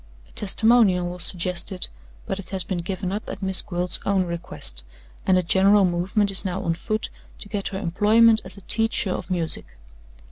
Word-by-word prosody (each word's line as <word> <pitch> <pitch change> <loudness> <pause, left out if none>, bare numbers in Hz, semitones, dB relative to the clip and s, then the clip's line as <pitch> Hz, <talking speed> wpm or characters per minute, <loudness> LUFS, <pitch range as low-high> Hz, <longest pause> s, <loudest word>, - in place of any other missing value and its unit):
A - - -23
testimonial 205 -3 +3
was 180 0 -2
suggested; 180 +1 0 0.4
but 190 - -3
it 195 - -9
has 190 -2 -2
been 180 0 -3
given 185 +1 -4
up 210 +2 -4
at 195 - -7
Miss 190 -1 +5
Gwilt's 175 0 -2
own 195 -1 +1
request, 170 - -3 0.5
and 185 - +5
a 180 - +2
general 195 +3 +4
movement 185 +4 0
is 190 - 0
now 190 0 -3
on 165 - 0
foot 215 +6 -3 0.3
to - - -10
get 205 -1 -3
her 190 - -5
employment 215 +5 +4
as - - -8
a - - -11
teacher 225 0 0
of - - -4
music. 170 - -2
190 Hz, 185 wpm, -23 LUFS, 180-205 Hz, 0.5 s, Miss